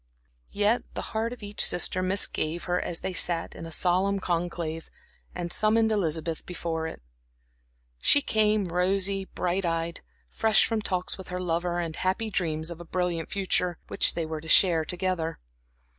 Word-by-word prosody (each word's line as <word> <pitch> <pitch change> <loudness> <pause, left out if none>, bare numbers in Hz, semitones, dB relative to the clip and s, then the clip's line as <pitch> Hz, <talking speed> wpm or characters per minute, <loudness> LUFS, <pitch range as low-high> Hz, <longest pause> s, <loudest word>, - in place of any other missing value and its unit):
Yet 210 +4 +1
the - - -3
heart 225 +1 -1
of 245 -3 -9
each 205 0 +1
sister 180 +1 +3
misgave 185 -3 +1
her 180 0 -1
as 170 - -4
they 190 - -3
sat 170 -1 0
in 165 - -8
a - - -9
solemn 185 +4 +1
conclave, 170 -3 -3 0.5
and 175 -1 -3
summoned 220 +1 +3
Elizabeth 165 -5 -1
before 165 -2 -4
it. 65 - -9 1.0
She 285 - +5
came, 215 -3 +1
rosy, 190 +2 +1
bright 180 +1 -2
eyed, 165 0 -2 0.3
fresh 220 - +3
from 225 -2 -1
talks 185 -2 -2
with 190 - -9
her 180 0 -4
lover 175 0 -1
and 165 -2 -3
happy 190 +4 -1
dreams 160 -3 -1
of 170 0 -8
a - - -7
brilliant 175 -1 -2
future, 180 -3 0
which - - +5
they 165 - -2
were 155 -1 -5
to 160 - -11
share 165 -4 +5
together. 180 -2 -1
180 Hz, 165 wpm, -27 LUFS, 165-195 Hz, 1.0 s, She